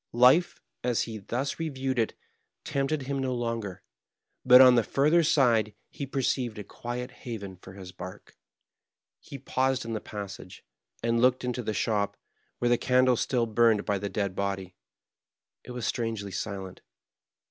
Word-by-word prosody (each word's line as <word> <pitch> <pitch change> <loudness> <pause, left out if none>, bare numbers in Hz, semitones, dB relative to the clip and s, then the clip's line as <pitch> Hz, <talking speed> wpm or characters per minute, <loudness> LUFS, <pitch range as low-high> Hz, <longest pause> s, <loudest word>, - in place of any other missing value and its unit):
Life, 130 +9 +5 0.2
as 120 -2 +1
he 110 -2 -6
thus 125 +10 -3
re 165 -1 -1
viewed 130 -2 -2
it, 115 - 0 0.5
tempted 140 +1 -1
him 135 +1 -2
no 130 -1 -1
longer; 115 -5 -3 0.6
but 125 0 +8
on 130 -1 +9
the 120 - +5
further 150 +9 +3
side 115 -9 +3 0.2
he 140 - -6
perceived 130 -3 -1
a 105 - -5
quiet 120 +4 -6
haven 100 -6 -7
for 95 +1 -13
his 95 -2 -10
bark. 95 0 -10 0.8
He 140 - -9
paused 130 -1 0
in 115 - -4
the 110 - -3
passage, 100 -3 -8 0.4
and 115 0 +2
looked 125 0 +3
into 125 0 -2
the 110 -2 -3
shop, 105 -3 0 0.4
where 120 - +1
the 120 - +3
candle 130 0 +4
still 120 0 0
burned 110 -1 +3
by 100 -1 0
the 100 +1 -3
dead 100 -1 -2
body. 95 -2 -3 0.9
It - - -14
was 125 -2 -4
strangely 115 -4 -2
silent. 95 -1 -5
120 Hz, 160 wpm, -28 LUFS, 105-130 Hz, 0.9 s, on